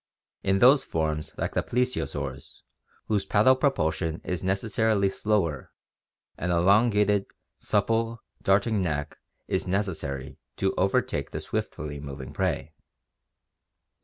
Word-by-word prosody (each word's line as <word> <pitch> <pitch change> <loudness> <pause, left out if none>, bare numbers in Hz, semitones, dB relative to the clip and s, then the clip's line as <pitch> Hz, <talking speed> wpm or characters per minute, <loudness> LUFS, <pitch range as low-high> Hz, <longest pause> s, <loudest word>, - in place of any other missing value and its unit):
In 95 0 +2
those 130 +7 +6
forms 80 -1 -2
like - - -2
the - - +1
plesio 125 +1 0
saurs, 65 -2 -7 0.4
whose 105 -2 0
paddle 120 +6 +4
propulsion 85 - 0
is 90 -1 -3
necessarily 100 +1 +1
slower, 95 -11 -1 0.7
an 90 - -2
elongated, 100 +3 +3 0.3
supple, 115 0 0 0.2
darting 100 +2 +2
neck 75 -4 -2 0.3
is - - -1
necessary 85 -9 -3 0.2
to 95 - +1
overtake 95 +1 0
the - - -4
swiftly 75 -1 -4
moving 70 -2 -8
prey. 75 - -1
95 Hz, 110 wpm, -27 LUFS, 80-110 Hz, 0.7 s, those